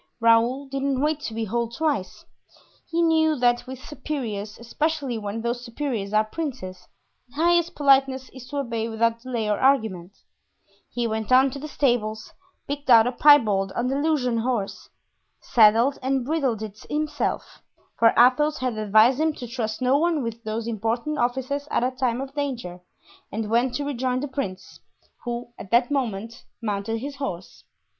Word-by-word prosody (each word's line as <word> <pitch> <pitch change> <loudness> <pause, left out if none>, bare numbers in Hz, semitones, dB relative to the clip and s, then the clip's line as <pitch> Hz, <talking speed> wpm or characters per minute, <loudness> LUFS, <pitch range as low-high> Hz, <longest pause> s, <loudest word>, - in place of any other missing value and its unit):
Raoul 230 +4 +3
didn't 275 -1 -2
wait 300 +2 +1
to 255 -6 -6
be 225 0 -2
told 235 +2 -2
twice; 295 -12 -2 0.6
he 335 0 +1
knew 320 -1 +3
that 245 -1 +1
with 260 0 -6
superiors, 220 -9 -5
especially 275 0 -2
when 210 +2 -5
those 240 +1 -2
superiors 235 -5 -4
are 215 0 +3
princes, 215 - -6 0.4
the 265 - -22
highest 345 +2 +2
politeness 270 -2 +3
is 255 -1 -12
to 290 - -5
obey 230 -4 -2
without 230 +1 0
delay 240 -3 -3
or 210 -1 0
argument; 220 -9 +1 0.8
he 240 -1 -2
went 220 -1 -2
down 260 +1 +5
to 280 - -7
the 305 - -6
stables, 240 -7 -1 0.3
picked 285 0 -5
out 225 -2 +8
a 245 - 0
pie 290 +3 +7
bald 195 -6 -1
Andalusian 260 -1 0
horse, 225 -4 -3 0.5
saddled 230 +4 +4
and 265 -1 0
bridled 265 -7 -1
it 215 -1 -8
himself, 300 0 -3 0.4
for 230 - +7
Athos 295 +6 +4
had 250 -4 -2
advised 220 +5 +4
him 315 0 +2
to 250 - -8
trust 230 -1 -4
no 260 +3 +3
one 325 -3 +1
with 230 0 -5
those 220 +1 -3
important 235 +6 -2
offices 265 +4 -1
at - - 0
a 255 - +1
time 255 -1 -1
of 270 0 -7
danger, 250 -11 -4 0.5
and 215 0 -4
went 240 +2 +2
to 290 - -2
rejoin 255 -2 -1
the 290 - -3
prince, 195 -9 -6 0.5
who 240 0 -4
at 195 - -9
that 240 +5 +3
moment 230 -5 -3 0.2
mounted 215 0 -2
his 280 +4 -6
horse. 185 -10 -6
245 Hz, 165 wpm, -24 LUFS, 225-280 Hz, 0.8 s, out